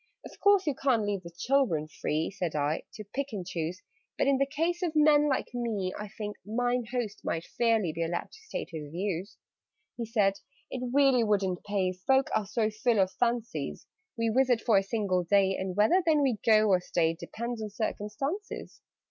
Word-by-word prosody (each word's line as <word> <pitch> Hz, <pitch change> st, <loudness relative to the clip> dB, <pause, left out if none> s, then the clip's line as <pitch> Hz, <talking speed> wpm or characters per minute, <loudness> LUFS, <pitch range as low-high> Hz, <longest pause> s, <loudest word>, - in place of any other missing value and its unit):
"Of -, -, -12 dB
course 405 Hz, -2 st, +4 dB
you 295 Hz, -, +1 dB
can't 250 Hz, -6 st, +1 dB
leave 205 Hz, -2 st, -1 dB, 0.2 s
children 250 Hz, -, +1 dB
free," 155 Hz, +2 st, -2 dB
Said 175 Hz, -5 st, -3 dB
I, 150 Hz, +1 st, 0 dB
"to 215 Hz, -, -7 dB
pick 280 Hz, 0 st, -1 dB
and 190 Hz, -4 st, -4 dB
choose: 170 Hz, 0 st, -4 dB, 0.3 s
But, -, -, +2 dB
in 275 Hz, -1 st, +3 dB
the 275 Hz, -, +2 dB
case 330 Hz, +5 st, -1 dB
of 335 Hz, -3 st, -1 dB
men 300 Hz, -1 st, +5 dB
like 265 Hz, -, -1 dB
me, 220 Hz, -6 st, -2 dB
I 210 Hz, -, -6 dB
think 210 Hz, 0 st, -6 dB
'Mine 245 Hz, +3 st, 0 dB
Host' 230 Hz, -5 st, -3 dB
might 165 Hz, 0 st, -2 dB
fairly 225 Hz, -8 st, +1 dB
be 165 Hz, -, -4 dB
Allowed 165 Hz, +1 st, -2 dB
to 440 Hz, -, -15 dB
state -, -, -4 dB
his 155 Hz, -3 st, -6 dB
views." 190 Hz, +2 st, -3 dB, 0.6 s
He 235 Hz, -2 st, -3 dB
said 205 Hz, -4 st, +2 dB, 0.3 s
"It 255 Hz, -1 st, -3 dB
really 270 Hz, -3 st, +4 dB
wouldn't 195 Hz, -4 st, 0 dB
pay 195 Hz, -3 st, 0 dB
Folk 265 Hz, +9 st, +1 dB
are 210 Hz, -, 0 dB
so 220 Hz, +1 st, 0 dB
full 220 Hz, 0 st, +1 dB
of 190 Hz, -1 st, +3 dB
fancies. 235 Hz, -, -1 dB, 0.3 s
We 230 Hz, 0 st, +1 dB
visit 250 Hz, 0 st, +3 dB
for 215 Hz, -5 st, +4 dB
a -, -, 0 dB
single 195 Hz, -3 st, 0 dB
day, 190 Hz, +2 st, +3 dB
And 190 Hz, -1 st, -3 dB
whether 220 Hz, -, +4 dB
then 310 Hz, -3 st, +3 dB
we 250 Hz, -6 st, +1 dB
go, 215 Hz, -1 st, +5 dB
or 185 Hz, -2 st, +4 dB
stay, 165 Hz, -2 st, +1 dB
Depends 235 Hz, +7 st, -5 dB
on 215 Hz, -, -4 dB
circumstances. 225 Hz, -, -4 dB
215 Hz, 190 wpm, -29 LUFS, 190-255 Hz, 0.6 s, men